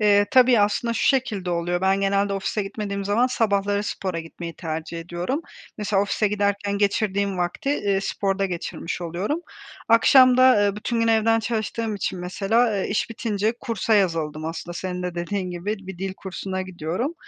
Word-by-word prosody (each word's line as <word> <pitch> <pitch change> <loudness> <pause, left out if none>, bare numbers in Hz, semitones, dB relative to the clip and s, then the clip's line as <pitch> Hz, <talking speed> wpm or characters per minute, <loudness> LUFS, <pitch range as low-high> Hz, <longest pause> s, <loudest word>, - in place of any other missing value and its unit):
Eee, 205 -1 +4
tabii, 250 -3 +6
aslında, 210 +3 +1
şu - - -1
şekilde 220 -10 +1
oluyor, 175 +1 -1
ben 190 +1 +2
genelde 200 0 +1
ofise 195 +2 -1
gitmediğim 200 0 -4
zaman 210 +5 +2
sabahları 205 -4 +1
spora 185 -4 -3
gitmeyi 165 +1 -8
tercih 160 0 -5
ediyorum. 175 - -3 0.4
Mesela 200 -1 +1
ofise 205 +1 0
giderken 200 0 0
geçirdiğim 200 -1 0
vakti, 185 +11 -1
ııı, 195 - +2
sporda 195 0 -1
geçirmiş 175 -1 -5
oluyorum. 180 - -2 0.5
Akşam 255 +2 +6
da, 255 - +5 0.2
ııı, 200 0 +1
bütün 230 +2 -2
gün 230 - +2
evden 225 0 +3
çalıştığım 225 -1 -2
için 190 -2 -3
mesela, 195 +6 +1
ııı, 205 -4 -1
iş 210 - -1
bitince 220 -1 -1
kursa 230 -3 0
yazıldım 165 -6 0
aslında 165 +2 -5
senin 180 0 -4
de 180 -1 -3
dediğin 180 +2 -3
gibi 180 +5 -3
bir 190 -2 -8
dil 190 0 -3
kursuna 190 0 -5
gidiyorum 185 - -3
200 Hz, 165 wpm, -23 LUFS, 180-220 Hz, 0.5 s, tabii